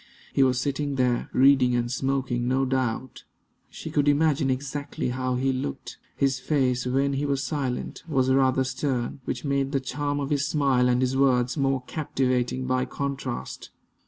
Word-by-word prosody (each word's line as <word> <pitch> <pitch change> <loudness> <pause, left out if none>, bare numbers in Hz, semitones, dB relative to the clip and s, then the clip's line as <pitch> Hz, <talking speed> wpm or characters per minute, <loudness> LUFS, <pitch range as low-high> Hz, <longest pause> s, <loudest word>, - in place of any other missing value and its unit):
He - - +2
was 130 -1 +3
sitting 140 +1 -2
there, 125 -2 0
reading 130 -2 +4
and 120 0 -1
smoking, 130 -2 -1
no 130 +1 +2
doubt. 130 -1 -2 0.5
She - - -8
could 145 0 +1
imagine 145 -1 +3
exactly 140 +1 -3
how 130 0 -1
he 130 +1 +1
looked. 100 - -5 0.2
His 135 -2 +1
face, 125 -3 0
when 135 +2 +1
he 140 +2 -1
was 140 -1 0
silent, 135 -4 -3
was 130 -4 +1
rather 130 0 +3
stern, 130 -1 -2
which 125 - -4
made 140 0 0
the 135 - +2
charm 145 +2 -2
of 140 0 -3
his 145 0 +1
smile 135 -5 +2
and 125 0 +2
his 130 +1 0
words 125 -2 +2
more 135 -3 0
captivating 130 -4 -1
by 130 0 +1
contrast. 135 -2 -5
135 Hz, 165 wpm, -26 LUFS, 125-140 Hz, 0.5 s, reading